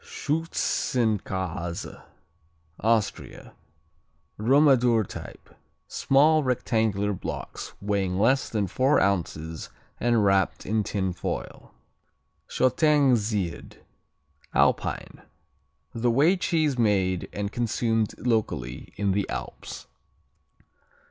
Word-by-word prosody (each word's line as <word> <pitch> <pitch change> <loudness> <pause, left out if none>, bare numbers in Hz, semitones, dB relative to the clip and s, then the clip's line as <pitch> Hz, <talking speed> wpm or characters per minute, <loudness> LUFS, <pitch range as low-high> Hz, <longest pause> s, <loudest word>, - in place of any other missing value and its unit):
Schützenkäse 110 - -2 0.8
Austria 110 -1 -1 0.9
Romadur 125 -2 +4
type. - - -10 0.4
Small 155 +3 +3
rectangular 110 -6 0
blocks 95 - -6
weighing 100 -2 -1
less 130 +7 +2
than 105 -3 0
four 130 +9 +2
ounces 80 -4 -2 0.3
and 120 -3 +2
wrapped 95 -1 +1
in 110 +1 0
tin 95 -3 -2
foil. - - -6 0.8
Shottengsied 125 - +1 0.8
Alpine - - 0 0.7
A 120 +1 0
whey 145 +10 +4
cheese 155 -7 0
made 95 -5 +1
and 100 0 -4
consumed 115 -2 0
locally 105 - -2
in 100 -1 0
the 100 +1 -1
Alps. - - -7
110 Hz, 80 wpm, -26 LUFS, 100-130 Hz, 0.9 s, Romadur